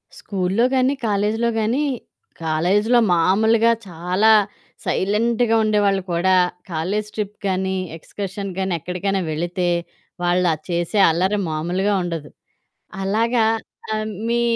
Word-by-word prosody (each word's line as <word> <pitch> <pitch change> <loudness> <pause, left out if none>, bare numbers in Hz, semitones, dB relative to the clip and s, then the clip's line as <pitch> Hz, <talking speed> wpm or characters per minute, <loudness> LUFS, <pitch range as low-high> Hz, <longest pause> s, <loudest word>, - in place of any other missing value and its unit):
స్కూల్లో 195 +4 0
గానీ, 260 +1 +3
కాలేజీలో 210 +3 +1
గానీ 230 +7 +1 0.6
కాలేజీలో 190 +9 +2
మామూలుగా 220 +7 +3 0.2
చాలా 180 +5 +2 0.5
సైలెంట్‌గా 225 +4 +1
ఉండేవాళ్ళు 205 -2 +2
కూడా 185 +2 +3 0.4
కాలేజీ 195 +7 -2
ట్రిప్ 210 -1 -4
గానీ, 190 0 0 0.2
ఎక్స్కర్షన్ 195 +3 -6
గానీ, 190 -1 -1
ఎక్కడికైనా 190 +4 -2
వెళితే 175 +3 -2 0.6
వాళ్ళు 175 +1 +2
ఆహ్, 155 - -7
చేసే 175 +4 0
అల్లరి 185 +5 +1
మామూలుగా 175 +6 0
ఉండదు. 165 -4 -4 0.7
అలాగా 225 +4 +2 0.5
ఆహ్, 215 0 -2 0.2
మీ 235 0 +1
195 Hz, 105 wpm, -21 LUFS, 180-215 Hz, 0.7 s, గానీ